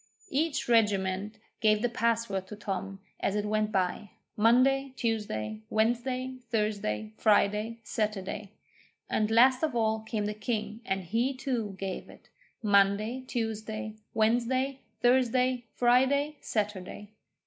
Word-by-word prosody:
Each 300 +1 0
regiment 205 -2 +2 0.2
gave 215 -1 +3
the - - +4
password 230 -5 0
to 210 - -7
Tom 195 -1 -5 0.2
as 200 - 0
it 210 0 0
went 215 0 0
by 190 +1 -1 0.3
Monday, 255 +5 +3
Tuesday, 110 - -2
Wednesday, 250 +3 0
Thursday, 200 - -1
Friday, 210 - +2
Saturday; 210 -2 -3 0.6
and 215 0 +1
last 250 +3 +5
of 310 -6 0
all 220 -1 +2
came 215 -1 -3
the 210 - -2
king, 215 +1 -3
and 190 -3 -1
he, 235 +9 0
too, 240 -7 -2
gave 190 -1 -5
it - - -16 0.3
Monday, 205 +4 +3
Tuesday, 220 -2 -3 0.2
Wednesday, 245 +5 +1 0.2
Thursday, 250 0 +3
Friday, 265 +5 +3
Saturday. 205 -1 -3
220 Hz, 120 wpm, -29 LUFS, 205-245 Hz, 0.6 s, last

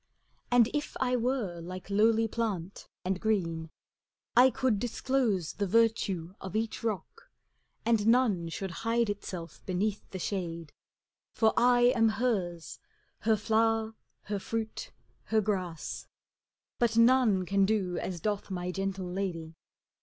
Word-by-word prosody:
And 245 -2 +5
if 295 -1 -3
I 250 -1 +1
were 235 -8 -1
like 185 +3 -8
lowly 225 +2 +4
plant 205 -5 -3 0.2
and 185 0 -1
green, 165 -7 0 0.7
I 250 +2 +8
could 245 -3 0
disclose 240 - 0
the 200 - -2
virtue 195 -5 +1
of 190 +2 -7
each 225 +1 -2
rock. 225 - -4 0.6
And 225 -2 +2
none 225 -8 +3
should 190 +3 -4
hide 230 -1 +1
itself 180 -5 -7
beneath 195 +3 -1
the 190 - -6
shade; 170 -4 -4 0.6
For 220 -1 +3
I 245 0 +4
am 225 -1 +4
hers, 200 -8 -2 0.4
her 220 0 +3
flower, 225 +1 +1 0.3
her 205 -1 -3
fruit, 225 - -4 0.4
her 220 - +2
grass; 185 -6 -3 0.7
But 235 -1 +2
none 230 -5 +5
can 195 +1 +2
do 190 -5 0
as 180 -2 -4
doth 205 +2 -2
my 180 -1 -3
gentle 195 0 -3
lady. 180 -3 -4
210 Hz, 130 wpm, -30 LUFS, 185-230 Hz, 0.7 s, I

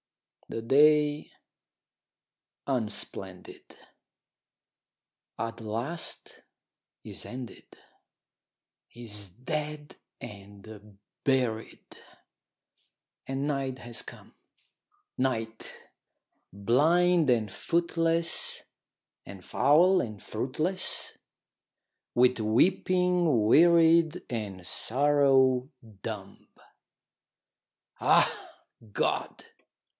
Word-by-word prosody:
The 115 - -5
day, 150 +3 +3 1.4
unsplendid, 105 -7 -5 1.6
at 115 0 -5
last 120 +10 -4 0.6
is - - -7
ended, 125 -2 -10 1.2
Is 105 -4 -5
dead 150 - -6 0.2
and 100 +1 -12 0.3
buried, 125 -5 -1 1.4
and 135 +2 -3
night 135 -3 -3
has 120 -1 -1
come; - - -13 0.8
Night, 115 -4 -2 0.8
blind 155 - +2
and 115 -4 +1
footless, 165 - +1 0.6
and 95 -2 -11
foul 175 +8 +4
and 110 -3 -7
fruitless, 155 - -3 1.0
With 125 0 +3
weeping 175 - +2
wearied, 165 +4 +4
and 100 -6 -5
sorrow 135 +1 +3 0.3
dumb. 100 -3 -8 1.5
Ah, - - +4 0.6
God! - - -2
130 Hz, 60 wpm, -28 LUFS, 110-155 Hz, 1.6 s, foul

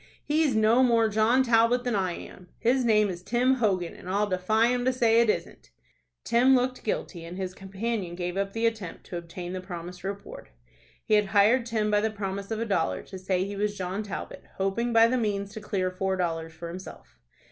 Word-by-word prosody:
He's 295 -4 +1
no 220 +3 +4
more 230 -3 +4
John 220 +5 +3
Talbot 235 0 +3
than 245 -1 -1
I 185 -3 0
am. 180 +1 -11
His 255 +3 +2
name 215 -3 +4
is 175 -3 -5
Tim 245 +6 +2
Hogan, 190 -7 0
and 180 - -10
I'll 200 +2 +2
defy 210 +4 +2
him 245 0 0
to 260 - +4
say 235 -2 +4
it 235 - +2
isn't." - - -3 0.5
Tim 250 +3 +4
looked 255 0 0
guilty, 180 -5 -3
and 170 +2 -8
his 185 -1 -4
companion 195 -1 -4
gave 175 0 -3
up 195 0 -2
the 225 +1 -1
attempt 220 -6 -3
to 175 - -6
obtain 175 +1 -7
the 185 - -4
promised 180 -1 -8
reward. 200 +1 -7 0.6
He - - 0
had 210 -1 +4
hired 230 +4 +4
Tim 215 -2 0
by 205 0 +3
the 220 - +1
promise 200 -2 -5
of 220 -1 -2
a 230 - -1
dollar 195 - 0
to 190 - -9
say 185 0 0
he 200 +1 -5
was 205 0 -1
John 185 +2 -3
Talbot, 210 -2 -7
hoping 195 +5 -1
by 225 0 +6
the 250 +2 +1
means 200 -3 -2
to 220 - -7
clear 190 -3 -1
four 190 +1 -1
dollars 165 -2 -2
for 170 +1 -8
himself. 170 - -10
205 Hz, 210 wpm, -27 LUFS, 185-230 Hz, 0.6 s, by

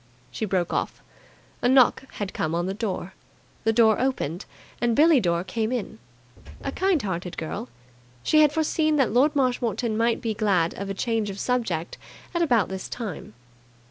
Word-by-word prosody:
She 220 - -3
broke 180 -3 -1
off. - - -2 0.6
A 245 - +3
knock 260 0 +4
had 200 -2 -4
come 160 +1 -1
on 175 +1 0
the 190 - -2
door. 195 -3 -4 0.5
The 225 - +4
door 225 -1 +4
opened, 205 - -2 0.4
and 240 -1 +2
Billie 310 0 +6
Dore 170 -4 0
came 220 +4 -2
in. 235 - -4 0.6
A 275 - -2
kind 375 +1 +1
hearted 180 -2 -4
girl, 155 -6 -5 0.5
she 310 - +4
had 300 -2 +5
foreseen 310 0 +1
that 270 -7 +2
Lord 285 +5 +3
Marshmoreton 245 -4 0
might 230 +1 +1
be 225 -2 -2
glad 190 -6 +1
of 200 0 -6
a 195 - -3
change 225 0 -1
of 195 0 -6
subject 195 -11 -2 0.3
at 340 - 0
about 240 - +3
this 190 -1 -6
time. 205 - -6
225 Hz, 175 wpm, -25 LUFS, 190-255 Hz, 0.6 s, Billie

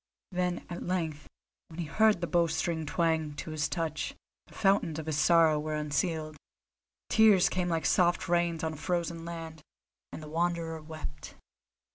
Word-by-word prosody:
Then 180 -1 -1
at 175 - -6
length, 165 -5 -2 0.4
when 165 +1 -11
he 170 - -2
heard 215 +3 +3
the - - +1
bowstring 165 -1 0
twang 160 -2 0
to 155 - -6
his 155 -1 -1
touch, 165 -3 -3 0.3
the - - -18
fountains 195 -6 +2
of 160 - -5
his 155 -2 -1
sorrow 160 -1 +5
were 155 +1 -3
unsealed; 155 +1 -1 0.7
tears 215 -5 +5
came 180 -1 -1
like 165 -1 -1
soft 175 0 +3
rains 170 -2 +1
on 160 0 -1
a - - -8
frozen 170 0 -2
land, 165 -2 -7 0.5
and 155 - -8
the - - -8
Wanderer 165 0 -1
wept. 155 -2 -8
165 Hz, 160 wpm, -30 LUFS, 155-175 Hz, 0.7 s, sorrow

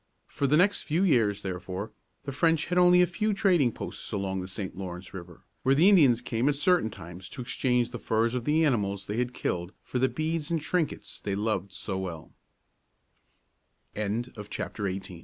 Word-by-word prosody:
For 140 - -1
the 150 +3 +4
next 200 +4 +3
few 165 +5 0
years, 115 - +2
therefore, 95 +2 -5 0.3
the 140 - -4
French 160 +3 +2
had 180 0 +1
only 180 0 +6
a - - +5
few 205 +4 -1
trading 175 - +3
posts - - -6
along 95 -2 -2
the 90 - -6
St. 95 0 -5
Lawrence 90 -1 -7
River, 90 -2 -10 0.2
where 135 +1 +3
the 165 +7 +5
Indians 140 - +5
came 120 +3 0
at 145 - +1
certain 155 -3 +3
times 90 -1 -10
to - - -8
exchange 125 0 0
the - - -6
furs 115 +1 +1
of 125 -2 -2
the 160 +2 +3
animals 100 -8 0
they 105 +2 -4
had 125 0 0
killed 85 +1 -2
for 125 - -3
the 130 +1 +3
beads 155 0 -2
and 165 -1 +1
trinkets 155 +1 -2
they 100 -1 -3
loved 100 -2 -1
so 95 -4 -5
120 Hz, 175 wpm, -28 LUFS, 95-155 Hz, 0.3 s, only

